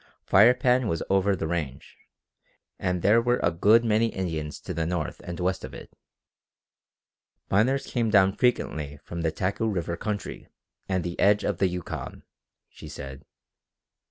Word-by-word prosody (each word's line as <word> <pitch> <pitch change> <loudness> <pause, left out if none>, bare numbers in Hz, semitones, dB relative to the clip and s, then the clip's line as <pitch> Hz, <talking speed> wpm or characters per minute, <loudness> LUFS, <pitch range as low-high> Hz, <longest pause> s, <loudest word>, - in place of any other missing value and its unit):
The - - -27
Firepan 125 +4 +5
was 80 -5 -1
over 95 +1 +3
the 80 - -3
range, 80 -5 -4 0.8
and 90 -2 -1
there 110 +4 +5
were 120 +1 +1
a - - +3
good 105 +8 +4
many 110 +1 +3
Indians 80 -7 -4
to - - -5
the 80 0 -2
north 85 -3 -3
and 90 0 -6
west 90 +1 -1
of - - -8
it. - - -11 1.6
Miners 130 +8 +2
came 115 -3 -1
down 95 -2 +4
frequently 75 - 0
from 85 0 -6
the 80 -1 0
Taku 95 +7 -1
River 85 -5 -2
country 105 +1 -5 0.4
and 95 -2 0
the 85 0 -5
edge 105 +1 +4
of 100 - -1
the 95 - +3
Yukon, 90 -1 -6 0.4
she - - -12
said. 70 +1 -9
95 Hz, 155 wpm, -26 LUFS, 85-110 Hz, 1.6 s, Firepan